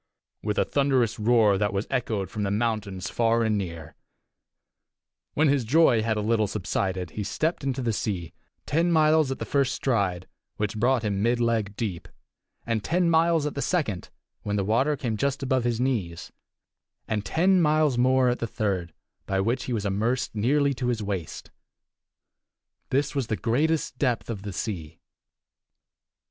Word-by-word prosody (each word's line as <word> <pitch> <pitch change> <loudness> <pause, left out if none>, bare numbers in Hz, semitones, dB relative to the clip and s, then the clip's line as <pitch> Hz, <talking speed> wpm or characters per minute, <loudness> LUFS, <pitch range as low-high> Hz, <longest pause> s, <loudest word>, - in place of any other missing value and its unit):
ho!" - - -10
with 105 - 0
a - - +3
thunderous 135 -6 +1
roar 105 -3 +4
that 105 -2 +1
was 100 +1 -1
echoed 110 -7 -1
from 105 +1 -4
the 100 - 0
mountains 105 -3 -2
far 115 0 +1
and 110 -1 +1
near. 85 -5 -5 1.4
When 155 +1 +3
his 140 -2 +2
joy 125 -2 +4
had 110 0 0
a - - 0
little 110 0 +1
subsided, 95 -3 -2
he 105 - -4
stepped 155 - -1
into 135 -1 -2
the 115 -2 0
sea 90 -6 -3 0.3
ten 165 +3 +1
miles 155 -2 +4
at 135 - -3
the - - -5
first 140 -2 +1
stride, 95 -8 -1 0.3
which 105 +1 -3
brought 125 +1 +2
him 100 -2 -1
mid 120 +2 +2
leg 115 -4 0
deep; 95 -7 -4 0.6
and 115 -3 -1
ten 175 0 +1
miles 165 -1 +3
at 150 - -2
the 140 - -3
second, 130 - -1 0.3
when 105 -1 -2
the 100 - +1
water 130 +8 +2
came 115 -5 -2
just 140 +3 -1
above 130 -2 +1
his 120 -2 0
knees; 110 -11 -2 0.8
and 105 -2 -1
ten 180 - +3
miles 155 -3 +3
more 130 +1 +3
at 125 - -1
the 115 - -2
third, 95 -7 -2 0.3
by 95 0 0
which 115 +6 0
he - - -4
was 105 -3 -2
immersed 115 +6 -1
nearly 140 +6 +2
to 125 -1 -3
his 115 -3 -1
waist. 95 -5 -5 1.4
This 140 +3 0
was 135 -5 -1
the 110 - 0
greatest 140 +3 0
depth 125 -4 0
of 105 -4 -5
the 100 0 -6
sea. 85 -7 -5
115 Hz, 175 wpm, -26 LUFS, 105-135 Hz, 1.4 s, roar